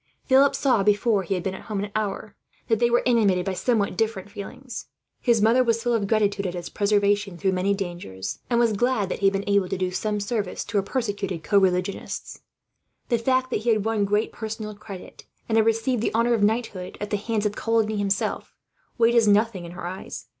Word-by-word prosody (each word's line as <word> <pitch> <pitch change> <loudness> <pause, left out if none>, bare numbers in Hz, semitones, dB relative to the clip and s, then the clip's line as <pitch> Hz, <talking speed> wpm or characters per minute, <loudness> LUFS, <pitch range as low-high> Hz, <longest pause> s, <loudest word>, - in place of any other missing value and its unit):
Philip 270 +1 +5
saw, 255 -7 +2
before 205 +1 +3
he 190 +1 -2
had 180 - -3
been 190 - -2
at - - -8
home 205 -2 -1
an 205 - -6
hour, 210 0 -3 0.3
that 225 -2 +3
they 240 0 +3
were 240 +1 +2
animated 205 -7 +3
by 195 - -1
somewhat 210 +1 0
different 215 -3 -2
feelings. 250 +6 -8 0.3
His 235 -4 +2
mother 235 +4 +5
was 230 -1 0
full 240 -1 +1
of 210 -4 0
gratitude, 205 -2 +1
at 180 - -4
his 175 -1 -5
preservation 205 -2 +1
through 190 +3 +1
many 190 +2 +1
dangers; 175 - -5
and 235 -1 +2
was 230 -2 +3
glad 215 -2 +1
that - - -3
he 200 - +3
had 195 - +3
been 195 0 -1
able 200 -2 +2
to 190 - -2
do 185 0 -1
some 210 +2 -1
service 205 -2 -3
to 205 - -2
her - - +4
persecuted 200 -6 -3
co 200 +3 +4
religionists 185 0 -2 0.7
the 235 - +2
fact 255 +2 +1
that - - 0
he 235 - -1
had 215 -2 +2
won 220 -2 +1
great 210 +2 +1
personal 220 -1 -5
credit, 200 -2 -11 0.2
and 225 - 0
had 225 0 +4
received 225 +1 +1
the 225 - -1
honour 235 +1 +3
of 225 - +1
knighthood 205 -4 -1
at 210 0 -5
the 205 - +1
hands 215 0 -2
of 210 0 0
Coligny 220 -2 +1
himself, 200 -1 -1 0.4
weighed 235 0 +4
as 230 -2 +4
nothing 205 -3 +2
in 170 - -9
her 180 -1 -7
eyes. 185 +2 -7
210 Hz, 220 wpm, -24 LUFS, 195-230 Hz, 0.7 s, Philip